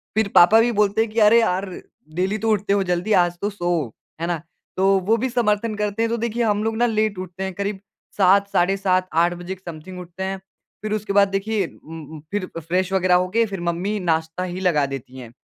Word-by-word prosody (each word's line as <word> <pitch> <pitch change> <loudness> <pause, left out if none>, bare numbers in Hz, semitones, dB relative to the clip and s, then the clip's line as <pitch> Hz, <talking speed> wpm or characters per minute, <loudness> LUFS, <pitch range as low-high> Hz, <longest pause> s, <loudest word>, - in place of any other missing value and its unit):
फिर 220 -1 +2
पापा 190 +6 +7
भी 240 +1 +2
बोलते 210 0 +2
हैं 225 - 0
कि 225 - -1
अरे 220 +2 +6
यार, 190 -3 0 0.5
डेली 190 +4 0
तो 225 +1 -1
उठते 205 -1 +1
हो 200 -1 +2
जल्दी 180 +3 0
आज 175 -2 +3
तो 205 - 0
सोओ, 175 -7 -1 0.3
है 170 - -1
ना? 170 -3 -2 0.4
तो 190 +1 +3
वो 210 +5 +1
भी 260 +3 -1
समर्थन 225 -2 0
करते 210 +1 -2
हैं 230 - 0
तो 235 - 0
देखिये 235 +1 -1
हम 210 -1 +1
लोग 225 0 -1
ना 240 - +3
लेट 215 -3 0
उठते 185 0 -6
हैं 190 -1 -4
करीब 200 +1 -3 0.4
7 200 +1 +4
साढ़े 185 +3 +2
7, 185 -1 +1
8 170 +2 +3
बजे 175 +2 -6
क - - -23
समथिंग 170 +3 -8
उठते 180 +1 -7
हैं। 190 0 -3 0.4
फिर 215 0 -3
उसके 210 -1 -2
बाद 200 0 +5
देखिए 195 +1 -1
उम 165 0 -11
उम, 160 - -8
फिर 205 -2 -1
फ्रेश 180 +4 -1
वगैरह 185 -1 +3
हो 180 +1 +2
के 230 - +4
फिर 195 -4 -6
मम्मी 175 +5 -2
नाश्ता 160 0 -1
ही 180 0 -5
लगा 170 -6 +2
देती 135 -1 -7
हैं। 120 -3 -10
190 Hz, 235 wpm, -22 LUFS, 175-210 Hz, 0.5 s, पापा